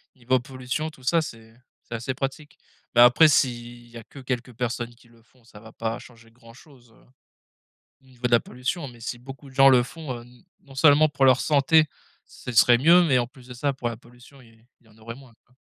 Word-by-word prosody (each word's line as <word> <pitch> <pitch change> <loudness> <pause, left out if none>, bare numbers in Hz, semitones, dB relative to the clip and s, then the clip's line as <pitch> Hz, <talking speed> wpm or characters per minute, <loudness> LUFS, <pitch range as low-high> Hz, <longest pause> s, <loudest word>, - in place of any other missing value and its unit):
niveau 130 0 0
pollution 130 +4 -5
tout 135 -5 -18
ça 165 +5 +2
c'est 115 -6 -10 0.3
c'est 115 - -7
assez 120 +3 -4
pratique. 135 +3 -6 0.4
Mais 120 - +6
après 120 +6 +7
s'il 120 -4 -1
y 120 0 -13
a 115 - -10
que 140 - -14
quelques 125 -1 -5
personnes 120 0 -4
qui 120 - -24
le 115 -1 -23
font, 120 +1 -29
ça 105 -2 -16
va 110 0 -14
pas 115 0 -4
changer 115 -1 -17
grand 115 -1 -18
chose, 125 -3 -20
heu, - - -25 1.0
au 135 - -28
niveau 125 -1 -5
de 120 - -9
la 120 - +6
pollution, 125 +7 -5
mais 120 -2 -14
si 120 +1 -6
beaucoup 135 +2 -12
de 130 - -18
gens 135 0 +7
le 125 -2 +5
font, 155 0 -8
heu, - - -10
n 120 +4 -20 0.2
non 135 -2 -17
seulement 150 +2 +5
pour 140 -2 +1
leur 130 -1 +4
santé, 155 +2 +3 0.4
ce 125 - -10
serait 120 +1 +5
mieux 170 +7 +5
mais 135 -6 +2
en 120 - 0
plus 130 0 -19
de 125 - -9
ça 140 +3 -2
pour 125 -2 -4
la 115 - -7
pollution 125 +3 -19
il 115 -1 -22 0.2
il - - -30
y - - -23
en 105 - -23
aurait 115 +1 -9
moins 130 -3 -17
quoi. 125 - -32
125 Hz, 240 wpm, -24 LUFS, 120-135 Hz, 1.0 s, après